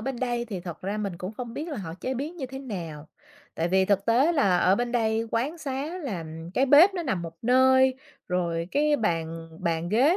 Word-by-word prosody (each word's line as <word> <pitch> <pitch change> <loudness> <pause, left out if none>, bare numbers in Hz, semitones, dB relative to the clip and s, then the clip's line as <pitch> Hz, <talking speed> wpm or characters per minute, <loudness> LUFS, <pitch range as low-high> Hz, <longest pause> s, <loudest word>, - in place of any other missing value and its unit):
bên 265 +3 -3
đây 240 -2 -1
thì 200 -6 -5
thật 175 -2 -8
ra 200 +3 -2
mình 200 -4 -3
cũng 185 +4 -5
không 240 0 -7
biết 310 +5 -4
là 300 - -4
họ 165 -6 -6
chế 260 +1 -2
biến 295 +7 -4
như 270 -6 -4
thế 265 +1 -8
nào. 170 - -7 0.5
Tại 165 +1 -1
vì 190 +1 +3
thực 200 0 +1
tế 255 +9 +4
là 195 - +3
ở 185 +2 +4
bên 240 +2 -2
đây 225 -1 +1
quán 280 +9 -1
xá 290 +4 -4
là 190 - -4 0.3
cái 270 - +3
bếp 325 +9 +7
nó 350 - -2
nằm 185 - -1
một 165 - -6
nơi, 260 +2 +5 0.3
rồi 170 -2 -1
cái 295 +1 +2
bàn 165 - -2
bàn 170 -1 -1
ghế 255 - +4
230 Hz, 225 wpm, -26 LUFS, 180-270 Hz, 0.5 s, bếp